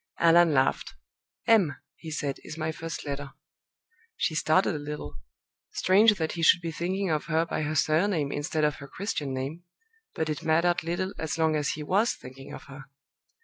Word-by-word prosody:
Allan 170 0 +5
laughed. 135 -2 +1 0.5
"M," 200 - +4 0.2
he 160 - -9
said, 145 -3 -3
"is 160 - -8
my 160 0 -1
first 165 +1 -6
letter." 140 -1 -5 0.8
She - - 0
started 155 +4 +2
a 150 - -3
little. 145 - -6 0.6
Strange 210 +4 +5
that 160 -4 -2
he 170 - -5
should 165 - +6
be 165 -1 -3
thinking 185 +3 -2
of 155 -1 0
her 165 0 +1
by 165 - -3
her 155 +1 -2
surname 155 -1 +2
instead 155 +2 -1
of 150 -1 +1
her 140 - -10
Christian 155 -6 -3
name; 135 +6 -4 0.5
but 160 - -1
it 155 +1 -3
mattered 170 +2 +2
little 175 +4 -2
as 160 0 -3
long 160 -1 +2
as 150 -1 0
he 150 - -6
was 200 +9 +2
thinking 130 +1 -11
of - - -9
her. 135 0 -11
160 Hz, 185 wpm, -27 LUFS, 145-175 Hz, 0.8 s, should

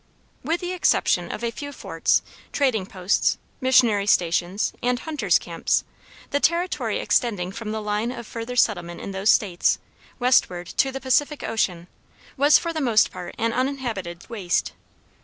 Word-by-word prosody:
With 330 +2 -1
the 355 0 -3
exception 370 +1 +1
of 235 - -6
a 235 - 0
few 285 +4 -7
forts, - - 0 0.3
trading 240 -9 +1
posts, 185 0 +1 0.2
missionary 235 -6 +4
stations, 180 +2 +1
and 245 0 +1
hunters' 255 - +1
camps, 170 -1 -1 0.5
the 285 - +1
territory 340 +4 0
extending 200 -7 0
from 215 +1 -6
the 220 0 -3
line 210 +3 -1
of 240 -2 -7
furthest 235 +3 +1
settlement 175 -5 -4
in - - -6
those 195 +2 0
States, 180 -5 +3 0.4
westward 235 -8 +2
to 270 +8 0
the 270 - -5
Pacific 280 +3 +1
Ocean, 180 -6 -1 0.5
was 290 +2 +6
for 335 -1 -3
the 315 - -2
most 230 -5 +3
part 175 - -8
an 230 0 0
uninhabited 235 -10 -3
waste. 200 -7 -1
230 Hz, 155 wpm, -24 LUFS, 190-265 Hz, 0.5 s, was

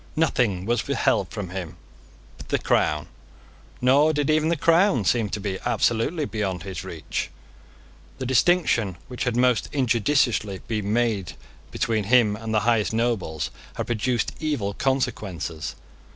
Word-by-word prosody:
Nothing 120 - +1
was 120 +2 0
withheld - - +1
from 100 -4 -5
him 90 -3 -6 0.6
but - - -13
the - - +2
crown; 75 0 +1 0.7
nor 140 +5 +4
did 145 0 +1
even 155 +1 +2
the 170 - +1
crown 165 - +3
seem 115 -4 +2
to 105 - -3
be 95 -1 -3
absolutely 145 +8 +1
beyond 95 - -3
his 95 -1 -6
reach. 85 -4 -4 0.9
The 130 - -4
distinction 125 - +2
which 125 -1 -4
had 120 -1 0
most 125 -1 +2
injudiciously 120 -5 +1
been 105 -3 -2
made 110 -5 0 0.4
between 110 -3 -1
him 110 -2 +4
and 110 +1 -6
the 110 -1 +2
highest 115 -2 +2
nobles 105 -10 -1 0.2
had - - -3
produced 120 0 0
evil 145 -11 -1
consequences. 105 - -2
115 Hz, 140 wpm, -24 LUFS, 100-130 Hz, 0.9 s, nor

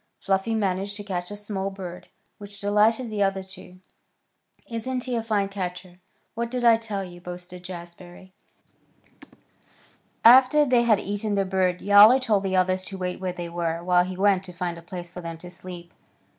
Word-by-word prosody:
Fluffy 195 +3 0
managed 200 -1 -1
to 205 - -7
catch 180 -3 -4
a 205 - -6
small 205 -2 -4
bird, 185 -2 -9 0.3
which 205 0 -11
delighted 215 +4 +2
the 210 -1 -2
other 195 -1 +1
two. 185 -1 -13 0.9
"Isn't 250 +2 -3
he 250 -2 -3
a 230 - 0
fine 210 -3 0
catcher? 180 -2 -6 0.3
What 235 0 -3
did 250 0 -3
I 230 -1 +6
tell 215 -3 -4
you?" 175 -1 -11
boasted 180 0 -8
Jazbury. 175 +1 -10 1.9
After 260 +5 +7
they 250 -3 +3
had 230 -4 +3
eaten 205 +1 -3
the 195 -1 +1
bird 185 -1 0
Yowler 205 +5 +8
told 225 -7 +1
the 190 -1 -1
others 185 0 +2
to 195 - -7
wait 180 -1 -4
where 185 -1 -2
they 175 -1 -6
were, 170 -1 -3
while 180 0 +4
he 185 0 -6
went 195 -1 +3
on - - -16
to 180 - -10
find 175 -1 -4
a - - -13
place 175 0 -8
for 180 - -8
them 165 -1 -6
to 180 +2 -11
sleep. 175 -1 -10
190 Hz, 185 wpm, -25 LUFS, 180-210 Hz, 1.9 s, Yowler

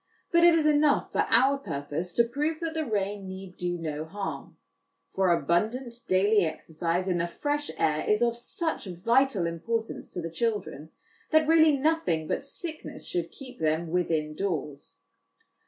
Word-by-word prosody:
But 340 0 +5
it 345 -1 +7
is 320 -2 +2
enough 300 -1 +3
for - - +1
our 265 +4 +4
purpose 145 - -4
to 235 - +4
prove 295 +7 -2
that 330 -1 -2
the 315 -2 -2
rain 200 -2 -2
need 190 -1 -8
do 175 0 -2
no 155 -2 -4
harm; 195 +5 -6 0.5
for 190 -1 +1
abundant 220 +9 0
daily 200 +2 +4
exercise 165 +3 -2
in 180 -2 +1
the 170 - 0
fresh 290 - -2
air 155 -1 +1
is 210 +2 +3
of 235 -1 +2
such 320 +6 -3
vital 220 +3 +2
importance 225 +7 -3
to - - -6
the 165 -1 -4
children, 185 -7 -2 0.4
that 315 -1 +4
really 315 -2 +6
nothing 265 - +1
but - - -1
sickness 310 +3 -6
should 170 -1 -2
keep 260 - -12
them 160 +1 0
within 160 -4 0
doors. 150 -5 -4
200 Hz, 160 wpm, -28 LUFS, 170-275 Hz, 0.5 s, it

